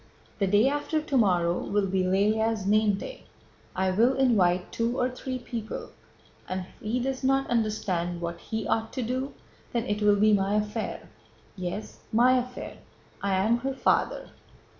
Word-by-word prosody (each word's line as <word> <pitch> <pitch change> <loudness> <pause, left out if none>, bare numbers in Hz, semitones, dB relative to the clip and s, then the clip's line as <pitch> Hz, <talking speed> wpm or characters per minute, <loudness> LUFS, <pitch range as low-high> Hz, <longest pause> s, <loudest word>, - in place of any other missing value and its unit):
The 200 - +2
day 205 +6 +4
after 290 +2 0
tomorrow 185 - +2
will 205 0 0
be 190 0 0
Lëlya's 210 +3 +1
name 210 0 +3
day. - - -8 0.5
I 190 0 +1
will 235 +7 +3
invite 190 -9 +2
two 235 +2 -1
or 250 0 +1
three 255 +1 -4
people, 235 -3 -6 0.6
and 185 0 -2
if 180 - -14
he 225 +4 -1
does 265 +1 -2
not 270 +1 +2
understand 190 -7 0
what 170 0 -4
he 220 -2 -4
ought 225 0 0
to 255 - -2
do 260 +4 -3 0.4
then 235 -1 0
it 210 +1 -2
will 205 0 +5
be 215 +1 +5
my 200 0 +2
affair—yes, 185 - -5
my 245 +3 +5
affair. 250 0 -6 0.4
I 200 -1 +1
am 215 +5 +3
her 270 +2 -3
father." - - +1
215 Hz, 160 wpm, -27 LUFS, 190-250 Hz, 0.6 s, will